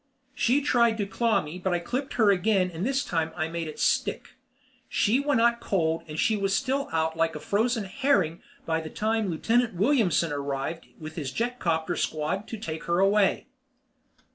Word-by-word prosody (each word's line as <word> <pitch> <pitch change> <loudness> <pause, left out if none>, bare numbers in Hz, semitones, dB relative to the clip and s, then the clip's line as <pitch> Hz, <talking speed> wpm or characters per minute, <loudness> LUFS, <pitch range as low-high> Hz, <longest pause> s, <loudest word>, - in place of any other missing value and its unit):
She 260 +3 +2
tried 235 -5 +3
to 205 - -1
claw 220 +2 +1
me 155 +4 -7
but 180 -1 0
I - - +2
clipped 250 +11 -4
her 220 -4 +4
again 190 -1 +2
and 165 +1 -5
this 270 +4 0
time 165 -2 -1
I 160 -1 -1
made 165 -1 -4
it 155 - -8
stick. - - 0 0.6
She 230 +6 +2
went 285 -3 +1
out 235 0 +3
cold 165 -7 0
and 155 0 -7
she 220 - +3
was 195 -1 0
still 275 +3 -1
out 160 0 0
like 165 0 0
a - - -4
frozen 220 - 0
herring 195 - +1 0.2
by 160 0 0
the 160 - -7
time 220 +1 -1
Lieutenant 225 +6 +1
Williamson 190 - +2
arrived 140 +3 -3
with 155 0 -9
his 140 -5 -3
jetcopter 175 - -1
squad 160 +7 -2
to 225 - -6
take 160 -6 -6
her 170 0 +1
away. 195 +1 +3
195 Hz, 185 wpm, -27 LUFS, 160-230 Hz, 0.6 s, her